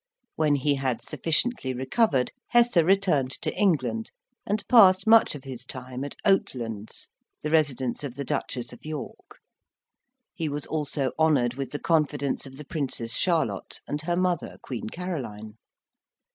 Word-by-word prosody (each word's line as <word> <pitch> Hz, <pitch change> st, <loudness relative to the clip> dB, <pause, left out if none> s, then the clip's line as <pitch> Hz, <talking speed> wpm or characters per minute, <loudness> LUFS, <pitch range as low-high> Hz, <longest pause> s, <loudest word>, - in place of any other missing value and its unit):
When 150 Hz, -2 st, +3 dB
he 145 Hz, +1 st, +1 dB
had 130 Hz, -4 st, -2 dB
sufficiently 165 Hz, -, 0 dB
recovered, 130 Hz, -, +1 dB, 0.2 s
Hesse 240 Hz, -2 st, +4 dB
returned 170 Hz, -6 st, +3 dB
to -, -, -2 dB
England, 130 Hz, -, +1 dB, 0.4 s
and 210 Hz, +1 st, -1 dB
passed 195 Hz, -6 st, +7 dB
much 225 Hz, -6 st, +6 dB
of 140 Hz, -, -9 dB
his 130 Hz, -2 st, -7 dB
time 130 Hz, 0 st, -6 dB
at 145 Hz, -, -6 dB
Oatlands, 115 Hz, -, -1 dB, 0.4 s
the 150 Hz, -, -2 dB
residence 140 Hz, -5 st, +1 dB
of 130 Hz, -4 st, -5 dB
the 140 Hz, -, -4 dB
Duchess 125 Hz, -2 st, -3 dB
of 120 Hz, -, -14 dB
York; 155 Hz, 0 st, -7 dB, 1.0 s
he 165 Hz, -6 st, -3 dB
was 145 Hz, 0 st, -4 dB
also 145 Hz, -3 st, -1 dB
honoured 140 Hz, -7 st, +3 dB
with 135 Hz, +1 st, -4 dB
the 145 Hz, -, -4 dB
confidence 145 Hz, -4 st, 0 dB
of 135 Hz, -, -11 dB
the 150 Hz, -, -9 dB
Princess 130 Hz, -7 st, -3 dB
Charlotte 170 Hz, -3 st, 0 dB
and 145 Hz, +1 st, -2 dB
her 175 Hz, +2 st, -1 dB
mother, 180 Hz, -1 st, -1 dB
Queen 120 Hz, -4 st, -5 dB
Caroline. 115 Hz, -, -6 dB
145 Hz, 145 wpm, -26 LUFS, 130-170 Hz, 1.0 s, passed